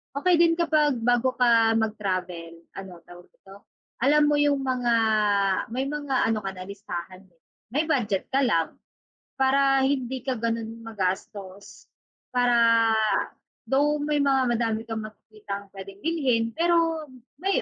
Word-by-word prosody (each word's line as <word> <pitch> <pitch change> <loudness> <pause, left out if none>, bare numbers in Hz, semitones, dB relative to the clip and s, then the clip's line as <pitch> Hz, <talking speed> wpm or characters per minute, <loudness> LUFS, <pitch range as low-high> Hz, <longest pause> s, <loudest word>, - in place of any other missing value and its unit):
okey 355 +5 +3
din 335 -1 +5
kapag 310 -5 +2
bago 245 +2 +1
ka 230 -3 +4
mag-travel, 185 -6 -3 0.3
ano 190 -1 -9
tawag 175 0 -15
dito 195 +1 -18 0.3
alam 295 +4 +3
mo 295 - +2
yung 290 -1 +2
mga, 250 -3 0 0.8
may 260 +3 -2
mga 290 -2 -1
ano 220 -2 -1
ka 195 - -3
na 185 0 -10
listahan, 185 -2 -8
eh. 165 - -36 0.3
May 300 +5 0
budget 220 -10 -1
ka 275 +1 +1
lang, 165 -9 0 0.6
para 270 0 +3
hindi 260 -2 -2
ka 265 - 0
ganun 230 0 -4
magastos. 195 -2 -5 0.5
Para, 245 -1 +3 1.1
though 290 +2 +2
may 295 0 0
mga 270 -3 +2
madami 225 -2 0
kang 220 -1 -4
makikitang 210 -2 -9
pwedeng 195 0 -11
bilhin 260 -9 0
pero 330 -2 +1 0.3
may 390 +7 0
240 Hz, 135 wpm, -25 LUFS, 200-280 Hz, 1.1 s, din